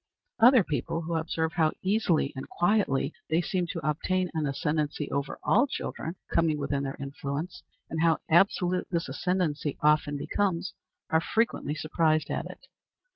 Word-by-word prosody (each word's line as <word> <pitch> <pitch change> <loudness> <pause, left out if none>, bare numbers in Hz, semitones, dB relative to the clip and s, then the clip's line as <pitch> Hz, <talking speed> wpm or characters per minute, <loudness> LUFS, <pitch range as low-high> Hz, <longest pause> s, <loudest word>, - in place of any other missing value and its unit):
Other 240 -1 +7
people, 160 +2 -2
who 170 +1 -3
observe 160 0 -1
how 160 -2 +2
easily 185 -7 +1
and 135 - -7
quietly 175 -7 +1 0.2
they 160 +1 +3
seem 180 0 -1
to 165 -2 -4
obtain 180 +4 0
an 155 -2 -1
ascendency 150 +1 -1
over 140 0 -2
all 255 - +4
children 165 - -5 0.2
coming 165 -2 +2
within 140 -1 -1
their 135 0 -4
influence, 140 +4 -5 0.3
and 160 - -3
how 165 -1 +4
absolute 180 +1 +3
this 170 -1 -1
ascendency 165 -6 -1
often 150 -1 +3
becomes, 185 +3 -1 0.4
are 160 0 +4
frequently 225 -8 0
surprised 155 +1 +1
at - - -2
it. - - -12
160 Hz, 150 wpm, -28 LUFS, 150-180 Hz, 0.4 s, Other